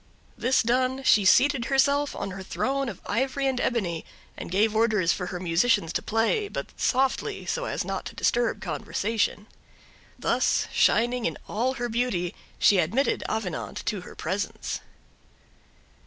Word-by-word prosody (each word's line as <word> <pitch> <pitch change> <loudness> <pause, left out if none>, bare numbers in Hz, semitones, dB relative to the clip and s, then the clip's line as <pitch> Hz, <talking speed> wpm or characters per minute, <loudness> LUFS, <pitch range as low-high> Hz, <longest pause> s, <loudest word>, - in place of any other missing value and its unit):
This 255 +1 +2
done 255 +3 +1
she 210 -5 +5
seated 255 +4 +4
herself 280 +2 +2
on 195 - -4
her 190 +1 -7
throne 270 +7 -1
of 195 - -8
ivory 265 +4 -1
and 265 -2 0
ebony 180 -9 -1 0.3
and - - -7
gave 210 +4 +2
orders 215 -6 +3
for 180 - -4
her 180 - -5
musicians 175 0 +2
to - - 0
play, 230 - +1
but - - -5
softly, 265 0 0
so - - -2
as - - -2
not - - -4
to - - -9
disturb - - +1
conversation. 215 -2 -1 0.7
Thus, - - +1
shining 240 +2 +3
in 165 - -4
all 245 +5 0
her 240 -1 -2
beauty, 225 -7 -1 0.2
she 200 - +5
admitted 225 - +1
Avenant 205 -7 -3
to 205 -4 -2
her - - -11
presence. 200 +2 -3
230 Hz, 150 wpm, -26 LUFS, 195-260 Hz, 0.7 s, she